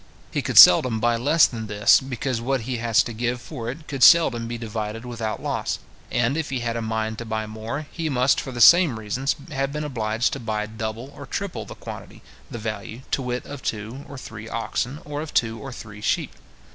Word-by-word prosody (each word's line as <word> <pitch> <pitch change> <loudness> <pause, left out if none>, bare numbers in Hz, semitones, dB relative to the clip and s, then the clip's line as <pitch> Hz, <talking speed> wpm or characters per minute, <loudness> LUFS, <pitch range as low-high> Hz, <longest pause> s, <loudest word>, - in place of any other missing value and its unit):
He - - -1
could - - -2
seldom 110 +5 +9
buy 120 +1 +2
less 145 +7 +4
than 110 -3 -4
this, 105 0 +5
because 130 -2 -3
what 130 +1 0
he 120 +1 -3
was 120 +2 +3
to 120 - -6
give 120 +2 -2
for 115 -1 -6
it 155 +5 -8
could 135 -3 -5
seldom 125 -7 +6
be 120 0 -4
divided 110 0 -5
without 115 -3 -4
loss; - - -2 0.3
and 120 +3 +1
if 160 -1 -2
he 130 -2 -2
had 115 -1 -2
a 115 - -2
mind 110 0 -2
to - - -4
buy 110 -1 -2
more, 110 +7 -5
he 165 -2 -3
must, 130 -1 +2
for 135 - -7
the 120 -1 -4
same 170 -2 +7
reasons, 115 +6 -1 0.2
have 135 -1 -1
been 150 +1 -3
obliged 115 -5 -1
to 135 - -4
buy 110 -2 -2
double 110 +4 -6
or 145 - -10
triple 195 +4 -4
the - - -10
quantity, - - -10 0.3
the - - -6
value, 110 +1 -5
to - - +1
wit, 125 -1 -3
of 140 -2 -8
two 110 +5 -4
or 140 - -8
three 115 -3 -9
oxen, 125 +4 -3
or 145 0 -4
of 155 - -8
two 115 -1 +1
or 135 +4 -7
three 105 -3 -10
sheep. - - 0
120 Hz, 220 wpm, -24 LUFS, 110-135 Hz, 0.3 s, seldom